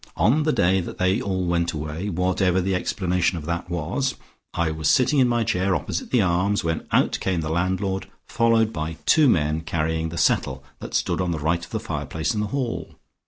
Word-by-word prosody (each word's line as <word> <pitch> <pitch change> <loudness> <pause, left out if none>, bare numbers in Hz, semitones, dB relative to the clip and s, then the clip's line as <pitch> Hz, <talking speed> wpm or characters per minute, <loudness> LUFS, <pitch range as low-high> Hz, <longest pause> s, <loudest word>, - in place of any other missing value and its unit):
On 115 - +3
the 155 +1 +2
day 95 -6 +2
that - - -7
they 95 +5 +1
all 95 -5 -1
went 85 0 0
away, 80 +5 -4
whatever 90 +1 +1
the 95 +1 0
explanation 90 -1 0
of 75 - -7
that 85 +1 -3
was, 90 - -1 0.4
I 85 -1 0
was 80 -1 -2
sitting 140 +2 +3
in 130 - +5
my 120 -1 +1
chair 95 -4 +1
opposite 95 -1 -3
the 120 -5 +3
Arms, 90 +3 +1
when 80 -1 -2
out - - +2
came 90 -3 0
the 75 - -3
landlord 95 +3 -1 0.2
followed 115 -1 +2
by 80 0 -4
two 155 -4 +5
men 75 -5 +1
carrying 80 0 -1
the 85 - -7
settle 65 -5 +1 0.2
that - - -6
stood - - 0
on 90 - -1
the 85 - -1
right 80 +3 0
of - - -9
the - - -3
fireplace 80 0 -3
in 105 - -2
the 105 - -1
hall. 125 +1 -3
90 Hz, 210 wpm, -23 LUFS, 80-105 Hz, 0.4 s, in